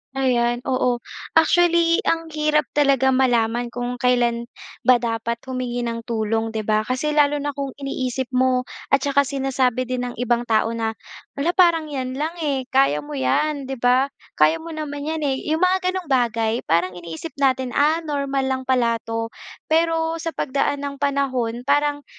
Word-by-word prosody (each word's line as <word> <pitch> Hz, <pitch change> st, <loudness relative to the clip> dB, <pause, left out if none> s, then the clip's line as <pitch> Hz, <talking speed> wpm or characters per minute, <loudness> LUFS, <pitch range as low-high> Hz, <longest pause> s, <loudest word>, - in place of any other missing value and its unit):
Ayan, 240 Hz, -2 st, +1 dB
oo 250 Hz, -2 st, +1 dB, 0.4 s
actually 340 Hz, 0 st, +3 dB
ang 330 Hz, 0 st, 0 dB
hirap 300 Hz, 0 st, +2 dB
talaga 270 Hz, -2 st, +3 dB
malaman 240 Hz, -2 st, +1 dB
kung 245 Hz, 0 st, -3 dB
kailan 240 Hz, -1 st, +1 dB, 0.4 s
ba 255 Hz, -1 st, +5 dB
dapat 230 Hz, 0 st, -2 dB
humingi 245 Hz, -2 st, -3 dB
ng 230 Hz, 0 st, -4 dB
tulong 225 Hz, -1 st, -1 dB
'di 220 Hz, -1 st, -4 dB
ba? 215 Hz, 0 st, +2 dB
Kasi 265 Hz, +6 st, -1 dB
lalo 295 Hz, -1 st, +3 dB
na 290 Hz, 0 st, -3 dB
kung 280 Hz, -1 st, -3 dB
iniisip 260 Hz, -2 st, -3 dB
mo 255 Hz, 0 st, +2 dB, 0.2 s
at 275 Hz, -, +5 dB
saka 280 Hz, +1 st, +2 dB
sinasabi 265 Hz, -3 st, 0 dB
din 250 Hz, 0 st, -2 dB
ng -, -, -13 dB
ibang 240 Hz, -1 st, +1 dB
tao 225 Hz, -2 st, +2 dB
na 225 Hz, -1 st, -1 dB, 0.5 s
hala 335 Hz, +5 st, 0 dB
parang 340 Hz, -4 st, +4 dB
'yan 260 Hz, -2 st, -4 dB
lang, 320 Hz, +3 st, -2 dB
eh, 270 Hz, -4 st, -1 dB
kaya 260 Hz, -, +3 dB
mo 150 Hz, 0 st, -7 dB
'yan 275 Hz, -, 0 dB
di 265 Hz, -1 st, -6 dB
ba? 255 Hz, +3 st, +3 dB, 0.2 s
Kaya 155 Hz, +1 st, +4 dB
mo 330 Hz, 0 st, -8 dB
naman 290 Hz, -1 st, -5 dB
'yan, 315 Hz, 0 st, -2 dB
eh, 270 Hz, -2 st, -2 dB
yung 315 Hz, +3 st, +1 dB
mga 370 Hz, +1 st, +3 dB, 0.2 s
ganong 355 Hz, -6 st, -5 dB
bagay. 230 Hz, -3 st, +1 dB
Parang 170 Hz, +3 st, +2 dB
iniisip 175 Hz, -, -8 dB
natin, 260 Hz, -2 st, +1 dB
ah, 310 Hz, +5 st, +2 dB
normal 280 Hz, -3 st, -1 dB
lang 260 Hz, 0 st, -2 dB
pala 235 Hz, -3 st, +2 dB
'to 225 Hz, 0 st, -3 dB, 0.4 s
pero 325 Hz, 0 st, +1 dB
sa 330 Hz, 0 st, -4 dB
pagdaan 280 Hz, +1 st, -1 dB
ng 280 Hz, -1 st, -5 dB
panahon 260 Hz, -5 st, -1 dB
parang 290 Hz, +1 st, +1 dB
260 Hz, 170 wpm, -22 LUFS, 240-290 Hz, 0.5 s, ba